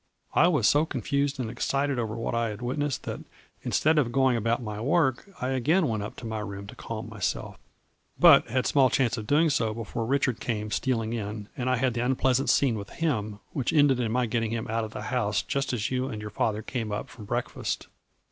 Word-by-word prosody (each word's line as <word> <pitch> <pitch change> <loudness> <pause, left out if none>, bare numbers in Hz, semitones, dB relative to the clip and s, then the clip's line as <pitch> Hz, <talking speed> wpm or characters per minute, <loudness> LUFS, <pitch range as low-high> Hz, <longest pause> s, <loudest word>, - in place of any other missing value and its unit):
I 170 - +5
was 150 -11 +3
so 145 +1 +4
confused 140 0 -1
and 125 - -1
excited 135 +3 -1
over 110 -2 -2
what 115 0 -3
I 115 -1 +1
had 105 +3 -7
witnessed 140 +2 -1
that - - -4 0.4
instead 155 0 +2
of 120 -5 +1
going 130 -1 +3
about 115 +1 +1
my 105 -3 -5
work 135 - +1
I 125 - -1
again 150 +7 +2
went 110 -3 -1
up 105 - -6
to - - -9
my 110 -1 -3
room 100 -2 -6
to - - -10
calm - - -6
myself, - - -3 0.6
but - - +8
had 130 +2 0
small 135 -3 +4
chance 125 -3 +1
of 110 -3 -6
doing 155 +4 +4
so 110 -5 0
before 115 0 -4
Richard 130 -3 +1
came 105 -3 -3
stealing 115 -2 0
in, 105 -2 -5
and 130 0 -2
I 130 - +3
had 125 0 +1
the 120 0 -1
unpleasant 130 +1 +2
scene 120 -6 +3
with 100 - -8
him, 110 -11 -2
which 130 -5 -1
ended 145 -4 +4
in 115 -3 0
my 125 +1 +2
getting 115 -1 -1
him 115 0 -2
out 115 +1 0
of 110 - -4
the 105 - -5
house 110 -4 0
just 140 -1 -1
as 115 -2 -2
you 130 0 0
and 110 -6 -5
your 105 0 -6
father 105 +1 -1
came 115 -4 -3
up 105 - -3
from 110 - -11
breakfast. 120 +3 -3
120 Hz, 225 wpm, -27 LUFS, 110-135 Hz, 0.6 s, but